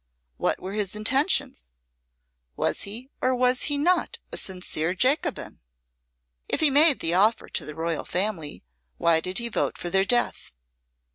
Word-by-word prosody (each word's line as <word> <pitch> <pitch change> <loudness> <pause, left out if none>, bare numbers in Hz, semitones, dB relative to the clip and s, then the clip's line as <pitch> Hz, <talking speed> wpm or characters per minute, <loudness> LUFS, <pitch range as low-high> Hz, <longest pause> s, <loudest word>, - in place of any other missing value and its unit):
What - - -1
were 190 +2 -7
his 205 -2 -2
intentions? 225 - +1 0.9
Was - - -1
he 245 +6 -8
or 255 0 +2
was 250 0 +2
he 290 -1 0
not 360 +9 +1
a - - -5
sincere 180 -2 -2
Jacobin? 280 - 0 0.9
If - - 0
he 310 -3 +5
made 295 +1 +5
the 165 - 0
offer 210 +5 +2
to - - -2
the 150 - -8
royal 165 0 -2
family, 180 -6 -3 0.3
why 165 -1 +3
did 185 +3 -5
he 235 - +1
vote 235 - -2
for 175 - -4
their 190 +1 +3
death? 240 - -1
215 Hz, 155 wpm, -25 LUFS, 180-265 Hz, 0.9 s, he